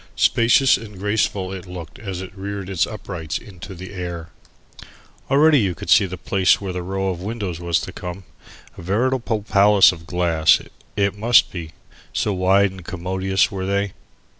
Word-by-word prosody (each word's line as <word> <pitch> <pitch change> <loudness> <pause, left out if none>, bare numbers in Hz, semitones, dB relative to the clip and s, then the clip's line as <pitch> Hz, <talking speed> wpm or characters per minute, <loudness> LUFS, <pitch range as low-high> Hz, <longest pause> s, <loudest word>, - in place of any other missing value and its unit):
Spacious 120 +3 +4
and 105 -3 -11
graceful 100 -1 -1
it 95 -1 -8
looked 90 +4 -9
as 95 -6 -5
it 95 - -11
reared 100 0 -5
its 95 -2 +1
uprights 90 -8 -5
into 95 -1 -11
the 95 +2 -9
air. 85 -3 -6 1.0
Already 145 +2 +5
you 95 -6 0
could - - -5
see 100 - +6
the 90 0 -7
place 95 +1 +2
where 95 -2 -5
the 90 - -3
row 95 +2 -2
of 90 -2 -4
windows 100 -4 -4
was 85 -1 0
to 95 - -6
come, 90 +1 -7 0.6
a - - -7
veritable 115 +3 0
palace 100 -1 +5
of 80 -2 -11
glass, 85 -3 +3 0.4
it 100 0 +1
must 115 +3 +4
be, 80 -3 -7 0.4
so 105 - 0
wide 95 +1 +3
and 95 -1 -11
commodious 95 +3 -1
were 95 -1 -4
they. 100 0 -1
95 Hz, 170 wpm, -21 LUFS, 90-100 Hz, 1.0 s, see